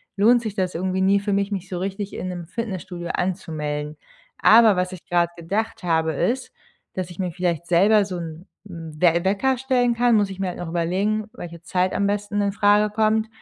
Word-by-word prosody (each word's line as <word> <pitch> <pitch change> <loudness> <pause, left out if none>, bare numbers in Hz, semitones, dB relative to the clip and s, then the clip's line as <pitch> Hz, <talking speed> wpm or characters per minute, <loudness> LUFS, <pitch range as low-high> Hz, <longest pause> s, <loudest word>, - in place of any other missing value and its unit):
lohnt 230 +4 +4
sich 215 -3 -5
das 185 -3 -1
irgendwie 185 +2 -1
nie 195 +1 +4
für 200 0 -2
mich, 200 +1 0
mich 195 -2 -4
so 180 -1 -4
richtig 195 +2 -4
in 185 - -4
'nem 175 -2 -6
Fitnessstudio 185 -5 -5
anzumelden. 150 -5 -3 0.4
Aber 220 -3 +6
was 180 0 -1
ich 180 - -11
gerade 175 -1 +1
gedacht 200 +6 -3
habe, 160 -2 +1
ist, 255 - -1 0.4
dass 185 -2 -4
ich 175 - -12
mir 180 -2 -1
vielleicht 170 -1 -2
selber 200 +4 +4
so 185 -2 -5
'n 165 +2 -8 0.2
'n 165 -4 -9
We 170 -1 +4
Wecker 250 +7 +1
stellen 245 -2 +1
kann, 240 0 +3
muss 205 -2 +2
ich 190 -1 -8
mir 195 - -1
halt 180 - -5
noch 175 - -5
überlegen, 190 +6 -1
welche 170 -8 -9
Zeit 180 +2 0
am 200 - +1
besten 205 0 -1
in 200 -1 0
Frage 210 0 +3
kommt, 220 0 +2
190 Hz, 205 wpm, -23 LUFS, 175-210 Hz, 0.4 s, Aber